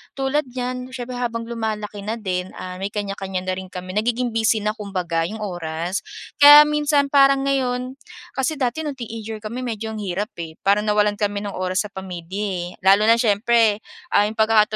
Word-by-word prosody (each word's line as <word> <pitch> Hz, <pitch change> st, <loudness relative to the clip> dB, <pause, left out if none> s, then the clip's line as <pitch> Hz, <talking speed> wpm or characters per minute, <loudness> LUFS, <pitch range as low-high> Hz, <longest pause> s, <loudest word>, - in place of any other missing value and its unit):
tulad 270 Hz, +2 st, 0 dB
niyan 250 Hz, 0 st, -5 dB
siyempre 245 Hz, 0 st, -5 dB
habang 230 Hz, -2 st, -2 dB
lumalaki 215 Hz, -3 st, -4 dB
na 220 Hz, +2 st, -2 dB
din, 185 Hz, -1 st, -3 dB
ah, 185 Hz, 0 st, -7 dB
may 195 Hz, -, -2 dB
kanya-kanya 195 Hz, -2 st, -3 dB
na 185 Hz, 0 st, -1 dB
rin 190 Hz, -, -8 dB
kami 185 Hz, 0 st, -7 dB
nagiging 240 Hz, +3 st, 0 dB
busy 225 Hz, 0 st, +2 dB
na 210 Hz, -, +1 dB
kumbaga 180 Hz, -5 st, -2 dB
yung 220 Hz, +1 st, -7 dB
oras. 175 Hz, -1 st, -3 dB, 0.4 s
Kaya, 290 Hz, +1 st, +11 dB
minsan 295 Hz, -1 st, +2 dB
parang 275 Hz, -1 st, +5 dB
ngayon 255 Hz, -1 st, -1 dB, 0.4 s
kasi 270 Hz, +4 st, 0 dB
dati 275 Hz, +3 st, -2 dB
noong 285 Hz, -2 st, -3 dB
teenager 225 Hz, -2 st, -6 dB
kami 230 Hz, +4 st, -5 dB
medyo 225 Hz, -1 st, -4 dB
ang 220 Hz, -, -6 dB
hirap 205 Hz, +3 st, -3 dB
eh, 160 Hz, -1 st, -6 dB
parang 205 Hz, +2 st, +3 dB
nawalan 210 Hz, 0 st, +2 dB
kami 205 Hz, -1 st, -1 dB
ng 200 Hz, -, -5 dB
oras 185 Hz, +2 st, 0 dB
sa -, -, -27 dB
pamilya 190 Hz, +1 st, -6 dB
eh, 180 Hz, -3 st, -3 dB, 0.2 s
lalo 195 Hz, +2 st, +6 dB
na 230 Hz, -, +6 dB
siyempre, 225 Hz, -1 st, +3 dB, 0.3 s
ah, 205 Hz, -, +5 dB
yung 220 Hz, -, -10 dB
pagka 220 Hz, -1 st, +5 dB
215 Hz, 185 wpm, -22 LUFS, 195-250 Hz, 0.4 s, Kaya